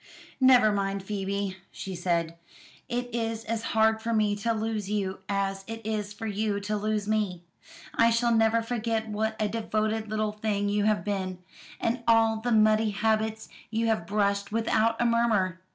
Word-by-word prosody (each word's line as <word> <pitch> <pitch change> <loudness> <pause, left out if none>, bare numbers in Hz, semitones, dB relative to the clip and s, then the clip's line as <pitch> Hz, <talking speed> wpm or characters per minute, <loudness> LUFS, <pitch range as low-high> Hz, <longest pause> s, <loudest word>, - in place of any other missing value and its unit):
"Never 255 -4 +6
mind, 195 -1 -1
Phoebe," 195 -1 -3
she 190 - -6
said; 170 -2 -1 0.5
"it 245 -1 -3
is 225 -1 -2
as 225 0 -2 0.2
hard 220 0 +4
for 230 +1 -1
me 210 -1 +2
to 230 +3 0
lose 220 -2 -2
you 195 -2 -2
as 195 -1 -1
it 225 0 -5
is 210 -2 -2
for 210 +2 -7
you 210 -1 -1
to 210 +1 -2
lose 210 0 -1
me. 205 -5 -1 0.5
I 230 - +4
shall 235 +1 +2
never 225 0 +3
forget 225 -1 -2
what 220 +1 -1
a 215 - +1
devoted 215 0 -1
little 215 0 0
thing 210 -1 -1
you 205 0 +1
have 215 -1 +2
been, 190 -3 -2 0.4
and 235 +2 -1
all 225 -1 +4
the 245 +1 -1
muddy 215 0 +4
habits 220 +1 0 0.2
you 225 +1 0
have 175 -7 0
brushed 200 0 0
without 225 0 +1
a 240 - +2
murmur. 220 -6 +2
215 Hz, 170 wpm, -27 LUFS, 200-225 Hz, 0.5 s, Never